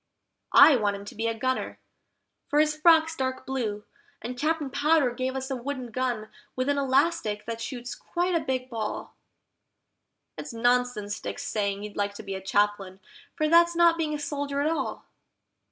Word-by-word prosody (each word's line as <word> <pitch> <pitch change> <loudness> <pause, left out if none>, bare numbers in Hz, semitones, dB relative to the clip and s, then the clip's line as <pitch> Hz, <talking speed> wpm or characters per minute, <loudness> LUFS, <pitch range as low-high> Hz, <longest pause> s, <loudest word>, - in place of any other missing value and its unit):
I 285 -1 +9
want 205 -3 0
him 200 0 -9
to - - -9
be 225 +2 -2
a 230 0 -2
gunner, 260 +3 -2 0.7
for 295 - +2
his 305 0 +3
frock's 320 0 +4
dark 260 -2 -3
blue, 225 -6 -3 0.4
and 250 +2 -6
Captain 305 +1 -1
Powder 290 -1 +3
gave 255 +1 -3
us 265 +1 -4
a - - 0
wooden 255 -1 -5
gun 240 -3 -2 0.3
with 255 +2 -1
an 285 0 +2
elastic 270 -5 +1
that 230 0 -5
shoots 245 -1 -5
quite 355 +1 -2
a 335 - +3
big 255 -3 -2
ball. 225 -4 -5 1.3
It's 295 - -7
nonsense 240 -3 0
Dick's 285 - -5
saying 200 -5 -2
he'd 210 -1 -8
like 200 0 -1
to 220 - -8
be 195 -1 -5
a 190 - -5
Chaplain, 195 -1 0 0.4
for 310 -2 +1
that's 340 +1 +5
not 340 -1 +5
being 315 -2 -1
a - - -5
soldier 285 -1 -3
at 300 +3 +1
all. 330 - -3
260 Hz, 180 wpm, -27 LUFS, 220-295 Hz, 1.3 s, I